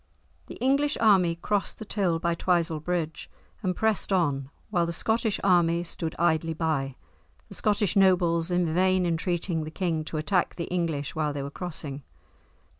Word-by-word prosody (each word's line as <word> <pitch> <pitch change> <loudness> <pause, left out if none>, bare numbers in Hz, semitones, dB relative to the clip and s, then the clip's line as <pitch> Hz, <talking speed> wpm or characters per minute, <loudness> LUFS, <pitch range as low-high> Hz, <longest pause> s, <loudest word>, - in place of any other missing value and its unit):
The - - -8
English 280 +3 +1
army 190 -6 +4
crossed 200 +4 -1
the 220 - -8
Till 190 -5 0
by 170 +1 0
Twisel 170 -2 +1
Bridge 160 -1 -3 0.3
and 185 -4 -1
pressed 220 -1 0
on 145 -8 +1 0.2
while 175 -4 +2
the - - -2
Scottish 220 +4 0
army 175 -3 +3
stood 165 -1 -4
idly 165 -1 +1
by, 150 -5 -1 0.5
the - - -9
Scottish 210 -1 +1
nobles 175 -3 +3
in 175 -2 +1
vain 185 +1 +3
entreating 170 0 -1
the 155 - -6
king 165 -2 -1
to 155 - -4
attack 175 +4 0
the 170 - -3
English 160 -5 -1
while 150 -2 0
they 140 -1 -4
were 140 - -6
crossing. 150 -5 -6
170 Hz, 165 wpm, -27 LUFS, 160-190 Hz, 0.5 s, army